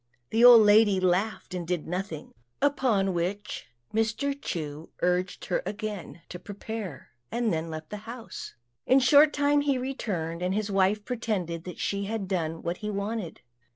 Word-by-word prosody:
The 225 +2 +3
old 245 -2 +10
lady 205 -2 +5
laughed 185 +2 0
and 175 -2 -4
did 175 -3 -1
nothing; 175 -3 -4 0.3
upon 250 -9 +2
which 190 +4 -3 0.3
Mr. 225 +6 0
Chu 155 -1 -5
urged 180 +1 0
her 180 - 0
again 205 -5 -6
to 180 - -7
prepare, 205 -6 -7 0.2
and 235 -4 0
then 160 +1 -2
left 155 -1 -7
the 210 - -4
house. 235 -1 -8 0.3
In 260 - +6
a - - +5
short 290 +4 +7
time 290 0 +2
he 280 -2 +1
returned, 190 -11 -3
and 180 +2 0
his 210 -1 -1
wife 195 +2 +2
pretended 195 -9 -3
that 180 - -7
she 200 0 -2
had 210 -1 -3
done 165 -4 -2
what 170 +1 -2
he 210 - -4
wanted. 205 -2 -4
200 Hz, 165 wpm, -27 LUFS, 175-225 Hz, 0.3 s, old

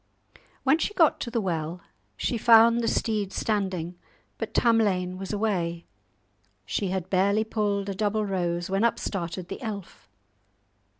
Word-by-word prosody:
When 280 +4 +4
she 415 - -2
got 325 -4 +4
to - - -4
the 235 0 -1
well, 170 -3 -3 0.4
she - - -1
found 230 +1 +6
the 230 - -1
steed 210 -4 0
standing, 185 -5 -2 0.4
but - - -4
Tamlane 195 -6 +2
was 195 - -5
away. 180 -6 -1 0.8
She 100 - -1
had 185 -1 -2
barely 200 +3 +3
pulled 205 -2 -1
a 200 - -2
double 210 +2 0
rose, 175 -3 -1
when 195 +2 0
up 235 - +2
started 175 -2 -4
the - - -7
elf. 205 - -7
200 Hz, 145 wpm, -26 LUFS, 180-220 Hz, 0.8 s, found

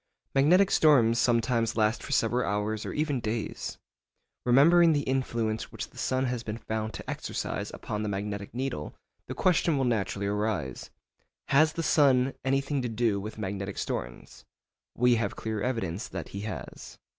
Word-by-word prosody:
Magnetic 180 +8 +5
storms 120 -7 +5
sometimes 115 -1 +1
last 110 +1 +2
for - - -8
several 120 +2 +1
hours 105 +1 -2
or - - -3
even 150 -3 -1
days. 110 -1 -4 0.7
Remembering 165 +7 +6
the 145 -1 0
influence 120 -4 -1
which - - -6
the - - -18
sun 130 0 0
has 125 -2 -2
been 110 -1 -5
found 110 -2 -4
to - - -8
exercise - - -3
upon 105 - -5
the 105 - -2
magnetic 100 0 -4
needle, 125 - -4 0.3
the - - -5
question 170 -4 +2
will 135 - +1
naturally 100 -4 -1
arise, 105 - -2 0.6
Has 155 +3 +4
the 165 - -3
sun 135 -4 +4
anything 135 +1 0
to 125 - -2
do 110 -2 +1
with 110 +2 -7
magnetic 100 -1 -4
storms? - - -5 0.5
We 125 -1 +4
have 115 - -2
clear 110 -2 -3
evidence 105 -6 -2
that - - -6
he 100 - -6
has. 110 +2 -7
115 Hz, 160 wpm, -28 LUFS, 105-135 Hz, 0.7 s, Remembering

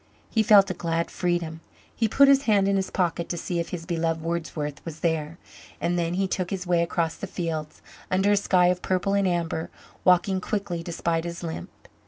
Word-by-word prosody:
He 220 - +3
felt 200 -3 +6
a - - -1
glad 170 -1 -2
freedom. 170 -3 -2 0.3
He 225 - +1
put 275 +6 +5
his 275 0 +5
hand 200 -3 +3
in 200 - +2
his 190 -1 0
pocket 170 -2 -1
to 175 - -2
see 175 +1 -2
if 170 - -3
his 165 -2 -5
beloved 165 -2 -1
Wordsworth 160 -3 -3
was 160 -2 -8
there 160 -1 -1 0.4
and 175 - 0
then 170 0 0
he 195 +1 +1
took 185 -1 -2
his 190 -2 -3
way 175 -1 +2
across 170 -1 0
the - - -7
fields, 160 -3 -4 0.3
under 190 +2 +2
a - - +5
sky 185 -3 +3
of 180 0 0
purple 185 +1 0
and 200 -1 +2
amber, 170 -2 -1 0.3
walking 185 +1 +3
quickly 190 -4 -3
despite 165 -1 -1
his 170 0 -6
limp. 160 - -5
175 Hz, 205 wpm, -25 LUFS, 165-190 Hz, 0.4 s, felt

